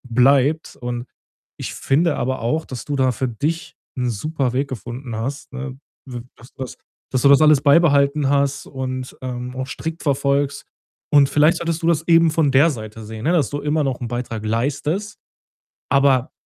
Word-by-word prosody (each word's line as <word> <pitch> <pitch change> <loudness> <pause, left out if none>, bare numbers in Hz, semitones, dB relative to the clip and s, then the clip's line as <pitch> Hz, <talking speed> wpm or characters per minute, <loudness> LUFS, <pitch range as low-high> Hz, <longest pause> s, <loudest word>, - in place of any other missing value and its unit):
bleibt. 140 +4 +3
Und 120 0 -4 0.5
ich - - -6
finde 155 +3 +1
aber 130 +2 -1
auch, 140 +8 -1
dass 125 -3 -7
du 145 - -2
da 130 -2 +2
für 130 +3 -2
dich 150 +9 -3 0.2
'n 125 -1 0
Superweg 135 +2 -1
gefunden 120 0 -6
hast, 135 +5 -5
ne, 135 0 -6 0.3
w 120 -1 -6 0.2
dass 120 - -16
du 135 - -6
das 130 - -9 0.3
dass 130 -2 0
du 140 - +6
das 140 +1 +7
alles 150 -3 +6
beibehalten 145 -2 +4
hast 140 0 +1
und, 130 -1 -5
ähm, 125 0 -5
auch 130 0 -4
strikt 160 +3 -5
verfolgst. 140 0 0 0.5
Und 140 -2 +6
vielleicht 155 +4 +4
solltest 170 0 -2
du - - +1
das 165 -1 +1
eben 165 -1 +5
von 155 -3 +2
der 140 +5 +5
Seite 110 -2 -8
sehen, 110 0 -8
ne, 165 - +3
dass 150 -8 +2
du 145 0 -3
immer 150 +1 0
noch 130 -2 -2
'n 120 - -3
Beitrag 120 -3 -4
leistest, 145 - -2 0.7
aber 135 -2 +3
140 Hz, 180 wpm, -21 LUFS, 125-150 Hz, 0.7 s, das